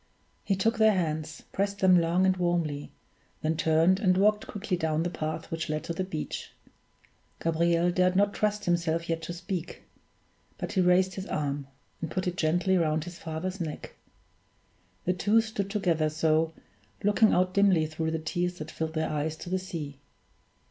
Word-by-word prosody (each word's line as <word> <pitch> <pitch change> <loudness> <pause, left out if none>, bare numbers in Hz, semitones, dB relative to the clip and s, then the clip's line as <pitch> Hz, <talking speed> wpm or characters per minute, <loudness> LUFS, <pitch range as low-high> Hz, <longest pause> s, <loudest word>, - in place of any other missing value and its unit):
He 195 - +1
took 225 +4 +1
their 220 -1 +6
hands, 155 -3 -2
pressed 200 +1 -1
them 185 -2 +5
long 170 +3 +2
and 190 0 +3
warmly, 170 -5 -1 0.5
then 160 +1 +1
turned 165 +4 +3
and 185 -3 +3
walked 210 +2 +3
quickly 205 -2 -2
down 160 -2 0
the 175 - -2
path 155 -1 -4
which 165 0 -3
led 155 0 -2
to 170 - -3
the 185 - -2
beach. 160 -5 -5 0.9
Gabriel 170 +1 +2
dared 180 +1 +2
not 205 +1 +3
trust 210 0 0
himself 170 -1 0
yet 165 0 0
to 165 - -5
speak; 175 0 -5 0.7
but - - -4
he 190 - +2
raised 185 +1 +4
his 190 +1 -6
arm, 140 -2 -2 0.3
and 165 - -3
put 185 +4 -2
it 180 -1 -1
gently 175 +3 +2
round 155 -1 +1
his 175 0 -9
father's 175 +4 -4
neck. 155 -3 -5 1.1
The 180 - +2
two 205 +5 +3
stood 220 -3 -2
together 170 -7 +1
so, 160 +1 +2 0.5
looking 210 +2 +4
out 185 0 +2
dimly 195 -5 +4
through 160 +1 -3
the 160 - -1
tears 175 +3 -2
that 155 0 -7
filled 160 0 -4
their 160 0 0
eyes 155 +1 -2
to 175 - -8
the 185 - +1
sea. 155 -7 -6
175 Hz, 175 wpm, -28 LUFS, 160-190 Hz, 1.1 s, their